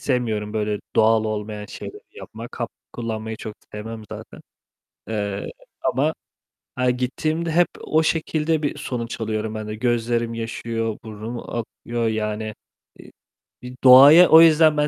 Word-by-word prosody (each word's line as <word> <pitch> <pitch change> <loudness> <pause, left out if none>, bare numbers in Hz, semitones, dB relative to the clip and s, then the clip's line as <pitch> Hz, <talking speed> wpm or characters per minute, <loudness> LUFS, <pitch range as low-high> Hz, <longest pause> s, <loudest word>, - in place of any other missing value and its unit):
sevmiyorum 110 -5 -1
böyle 105 -1 -1 0.2
doğal 110 0 +4
olmayan 105 -1 -4
şeyleri - - -9
yapmak, - - -10
hap - - -2 0.2
kullanmayı 110 -1 -4
çok 110 -1 -7 0.2
sevmem 110 +1 -7
zaten. - - -9 0.7
Eee, 100 -2 -3 0.3
ama - - +1 0.6
ha 125 0 +1
gittiğimde 155 +7 -1
hep 175 +2 +4
o 160 +1 +1
şekilde 160 -1 0
bir 145 - -1
sonuç 115 -2 -5
alıyorum 110 0 -2
ben 110 -1 -5
de. 105 - -5
Gözlerim 120 0 0
yaşarıyor, 115 -1 -3
burnum 110 +2 -7
akıyor, 120 0 -3
yani, 110 0 -2 0.5
i - - -14 0.5
bi 125 0 -9
doğayı 140 +7 +9
o 160 +1 +9
yüzden 155 -1 +6
ben 150 0 +2
115 Hz, 135 wpm, -22 LUFS, 110-130 Hz, 0.7 s, doğayı